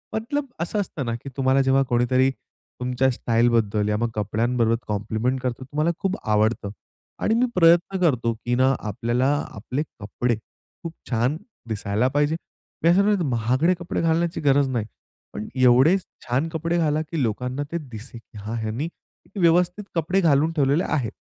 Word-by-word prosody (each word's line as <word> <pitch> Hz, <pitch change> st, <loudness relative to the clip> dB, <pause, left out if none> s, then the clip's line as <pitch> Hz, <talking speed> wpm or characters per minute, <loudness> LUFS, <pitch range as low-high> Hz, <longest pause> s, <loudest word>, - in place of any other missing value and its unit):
मतलब 265 Hz, +7 st, -2 dB
अस 170 Hz, +5 st, -4 dB
असतं 185 Hz, -9 st, -2 dB
ना 115 Hz, -1 st, -2 dB
की 140 Hz, -, -6 dB
तुम्हाला 135 Hz, 0 st, +3 dB
जेव्हा 135 Hz, +1 st, +3 dB
कोणीतरी 130 Hz, +2 st, +3 dB
तुमच्या 125 Hz, +1 st, -3 dB
स्टाईल 120 Hz, 0 st, +2 dB
बद्दल 105 Hz, -2 st, +1 dB
या 105 Hz, -, +1 dB
मग 120 Hz, +1 st, 0 dB
कपड्यांबरोबर 115 Hz, +3 st, +1 dB
कॉम्प्लिमेंट 110 Hz, +5 st, -1 dB
करतो 125 Hz, 0 st, -3 dB
तुम्हाला 150 Hz, +5 st, 0 dB
खूप 195 Hz, 0 st, -1 dB
आवडतं 105 Hz, 0 st, +1 dB, 0.5 s
आणि 220 Hz, -, +2 dB
मी 245 Hz, -, +3 dB
प्रयत्न 175 Hz, +2 st, +4 dB
करतो 125 Hz, -9 st, +2 dB
की 120 Hz, +2 st, -2 dB
ना 130 Hz, +2 st, +4 dB, 0.2 s
आपल्याला 120 Hz, +5 st, 0 dB, 0.3 s
आपले 125 Hz, +8 st, -3 dB, 0.2 s
कपडे 115 Hz, +3 st, -1 dB
खूप 160 Hz, +9 st, -13 dB, 0.2 s
छान 125 Hz, +5 st, +1 dB, 0.3 s
दिसायला 105 Hz, +2 st, 0 dB
पाहिजे. 145 Hz, +3 st, +1 dB, 0.5 s
मी 165 Hz, -, +5 dB
असं 185 Hz, +3 st, +5 dB
म्हणतो, 205 Hz, -3 st, +2 dB
महागडे 130 Hz, +9 st, +2 dB
कपडे 175 Hz, -, -3 dB
घालण्याची 165 Hz, +1 st, +1 dB
गरज 140 Hz, -1 st, +3 dB
नाही. 120 Hz, -5 st, -1 dB, 0.5 s
पण 105 Hz, -, -5 dB
एवढे 130 Hz, +8 st, +5 dB, 0.3 s
छान 130 Hz, +6 st, +1 dB
कपडे 165 Hz, +2 st, -1 dB
घाला 155 Hz, -2 st, +1 dB
की 165 Hz, -3 st, -2 dB
लोकांना 125 Hz, +5 st, -2 dB
ते 170 Hz, -, -1 dB
दिसेल 115 Hz, +2 st, -9 dB
की 110 Hz, -, -16 dB
हा, 105 Hz, +2 st, -6 dB
ह्यांनी 115 Hz, +9 st, -2 dB, 0.5 s
व्यवस्थित 175 Hz, +3 st, +3 dB
कपडे 175 Hz, +4 st, +1 dB
घालून 155 Hz, -1 st, +3 dB
ठेवलेले 150 Hz, +1 st, +2 dB
आहेत. 130 Hz, -9 st, -1 dB
130 Hz, 160 wpm, -23 LUFS, 115-165 Hz, 0.5 s, मी